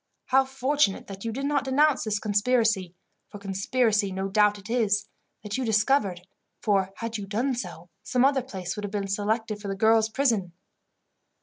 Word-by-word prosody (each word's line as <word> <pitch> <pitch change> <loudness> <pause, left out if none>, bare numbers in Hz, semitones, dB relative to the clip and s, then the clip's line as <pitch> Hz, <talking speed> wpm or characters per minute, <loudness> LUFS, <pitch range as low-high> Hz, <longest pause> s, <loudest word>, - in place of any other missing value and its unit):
How 265 +1 +4
fortunate 265 -4 0
that 195 -1 -9
you 230 - -1
did 270 +5 -4
not 285 -1 +1
denounce 285 +1 +3
this 215 -1 0
conspiracy 210 -3 +1 0.3
for - - -9
conspiracy 200 +1 0
no 190 +1 -3
doubt 210 +1 +3
it 200 0 -12
is 215 -3 +1 0.4
that 210 +4 -3
you - - -1
discovered, 215 -4 +2 0.4
for, 195 -3 +1
had 230 -1 -4
you 200 - -6
done 235 +7 0
so, 175 -7 -6
some 250 +1 +2
other 275 -1 +3
place 190 -8 -6
would 210 - -6
have 205 - -3
been 200 -1 -3
selected 210 +2 -1
for 205 - -6
the 195 - -2
girls' 220 +2 +3
prison." 220 -9 0
215 Hz, 180 wpm, -26 LUFS, 195-250 Hz, 0.4 s, How